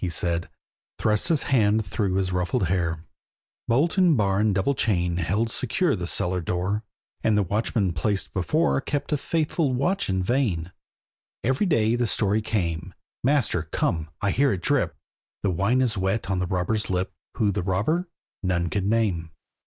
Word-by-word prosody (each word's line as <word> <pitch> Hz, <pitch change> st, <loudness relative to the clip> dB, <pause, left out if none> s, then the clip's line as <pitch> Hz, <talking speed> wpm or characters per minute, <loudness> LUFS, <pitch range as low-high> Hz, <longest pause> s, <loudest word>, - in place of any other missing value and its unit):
he 90 Hz, -, 0 dB
said, 85 Hz, 0 st, 0 dB, 0.5 s
Thrust 105 Hz, -1 st, +1 dB
his 165 Hz, -5 st, +2 dB
hand 110 Hz, -4 st, +2 dB
through 95 Hz, +1 st, -1 dB
his 95 Hz, -1 st, 0 dB
ruffled 90 Hz, +6 st, 0 dB
hair. 85 Hz, -3 st, -1 dB, 0.6 s
Bolt 150 Hz, +11 st, +2 dB
and 175 Hz, -6 st, +5 dB
bar 100 Hz, -2 st, +2 dB
and 105 Hz, -2 st, +2 dB
double 100 Hz, +9 st, +2 dB
chain 90 Hz, -8 st, 0 dB
Held 100 Hz, +7 st, 0 dB
secure 140 Hz, +7 st, +1 dB
the 90 Hz, -3 st, -4 dB
cellar 90 Hz, +1 st, +1 dB
door; 90 Hz, +6 st, -1 dB, 0.4 s
And 110 Hz, -2 st, +3 dB
the 105 Hz, -, +3 dB
watchman 100 Hz, -1 st, 0 dB
placed 95 Hz, +5 st, -1 dB
before, 150 Hz, -, +1 dB
Kept 145 Hz, +2 st, -3 dB
a -, -, +2 dB
faithful 155 Hz, -2 st, 0 dB
watch 175 Hz, -, 0 dB
in 95 Hz, -1 st, 0 dB
vain. 95 Hz, -8 st, 0 dB, 0.7 s
Every 135 Hz, -, +1 dB
day 115 Hz, -8 st, +2 dB
the 120 Hz, -1 st, +1 dB
story 105 Hz, 0 st, +1 dB
came, 85 Hz, -7 st, -2 dB, 0.3 s
"Master, 130 Hz, -, +2 dB
come! 80 Hz, -2 st, -1 dB
I 100 Hz, -, +2 dB
hear 140 Hz, +4 st, +3 dB
it 90 Hz, -3 st, -3 dB
drip!" -, -, +1 dB, 0.5 s
The 100 Hz, -, +2 dB
wine 100 Hz, +9 st, +2 dB
is 115 Hz, -6 st, 0 dB
wet 95 Hz, +1 st, -1 dB
on 95 Hz, -, 0 dB
the 90 Hz, -, -1 dB
robber's 95 Hz, +4 st, -1 dB
lip, 95 Hz, 0 st, -1 dB, 0.2 s
Who 105 Hz, -2 st, +2 dB
the 100 Hz, -, -1 dB
robber, 105 Hz, -, 0 dB, 0.3 s
none 85 Hz, -3 st, 0 dB
could 100 Hz, -2 st, -1 dB
name. 100 Hz, -7 st, +1 dB
100 Hz, 170 wpm, -25 LUFS, 90-120 Hz, 0.7 s, and